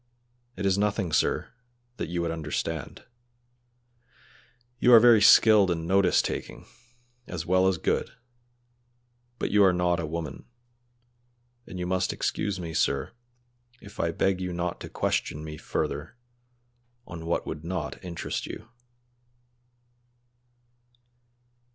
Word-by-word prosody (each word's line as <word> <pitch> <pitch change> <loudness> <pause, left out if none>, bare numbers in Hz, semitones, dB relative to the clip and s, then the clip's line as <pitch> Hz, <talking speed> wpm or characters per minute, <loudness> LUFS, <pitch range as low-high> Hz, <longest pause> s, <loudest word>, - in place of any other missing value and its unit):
"It 100 - -4
is 95 0 +2
nothing, 105 -4 0
sir, - - 0 0.4
that - - -4
you 85 0 -2
would 85 - -1
understand; 80 -1 -4 1.7
you 125 - +4
are 115 - +11
very 115 -2 +6
skilled 105 -1 +7
and 80 -2 -2
notice 95 0 +3
taking, - - -5 0.6
as 85 -2 -5
well 95 +1 +3
as 95 -2 +1
good, - - -1 1.3
but - - -2
you 105 0 +5
are 95 - +6
not 90 0 +1
a 80 - -3
woman, 80 -3 -6 1.2
and 90 - -8
you 90 - -3
must 95 0 0
excuse 100 -2 -2
me, 85 -2 -6
sir, 70 -3 0 0.7
if 100 +2 -14
I 85 - +1
beg 95 +3 0
you 90 -1 -3
not 85 0 -3
to - - -8
question 75 - -2
me 75 -1 -7
further 75 +8 -4 0.9
on 85 -1 -8
what 85 - -1
would 75 - -6
not 85 -4 -5
interest 85 -2 -4
you." 110 - -9
90 Hz, 125 wpm, -27 LUFS, 80-95 Hz, 1.7 s, are